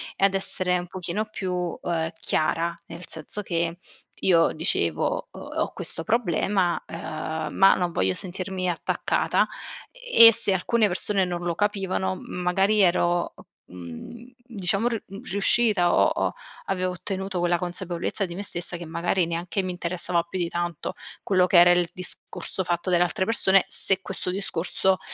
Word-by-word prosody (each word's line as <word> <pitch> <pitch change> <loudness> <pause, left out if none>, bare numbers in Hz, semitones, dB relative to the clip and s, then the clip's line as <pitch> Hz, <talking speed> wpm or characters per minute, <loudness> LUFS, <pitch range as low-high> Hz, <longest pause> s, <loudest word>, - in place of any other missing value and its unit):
e 195 - +3
ad 195 - +2
essere 185 -1 0
un 175 - -7
pochino 185 +3 -3
più, 205 -3 -5 0.3
uhm, 165 -2 -2
chiara. 165 +2 0
Nel 170 +1 -10
senso 160 +6 -6
che 170 -1 -1 0.4
io 170 -3 +4
dicevo, 85 - -1
uhm, - - -11 0.2
ho - - 0
questo 165 - -2
problema, 190 -3 +1
ehm, 160 -1 -5
ma 195 0 +6
non 175 -1 -1
voglio 95 - 0
sentirmi 185 0 -4
attaccata 175 -2 0 0.4
e - - +7
se 205 - +3
alcune 215 +4 +2
persone 195 +1 +1
non 175 -1 -4
lo 175 -1 0
capivano 190 -1 -1
magari 195 +4 +1
ero, 175 -1 +2 0.3
mhmm, 90 - -10
diciamo 205 -1 0
r 230 -3 -2
mhmm, 195 +1 -9
riuscita 200 -2 +2
o - - +5
o - - -1 0.3
avevo 185 -1 -1
ottenuto 190 +1 -4
quella 175 0 +2
consapevolezza 180 +2 -3
di 170 -2 -8
me 200 - -5
stessa 175 -2 -3
che 170 - -8
magari 170 +2 0
neanche 170 +3 -2
mi 185 - -3
interessava 175 0 -1
più 170 +2 -6
di 175 -2 0
tanto 175 -2 -3 0.3
quello 185 -2 +3
che 185 - +4
era 175 +1 +7
il 175 -1 +2
discorso 180 +1 -3
fatto 175 +1 -2
dalle 175 0 +4
altre 180 +1 -1
persone, 195 -4 +3
se 190 -1 +4
questo 180 - -4
discorso 190 0 0
180 Hz, 160 wpm, -25 LUFS, 170-195 Hz, 0.4 s, e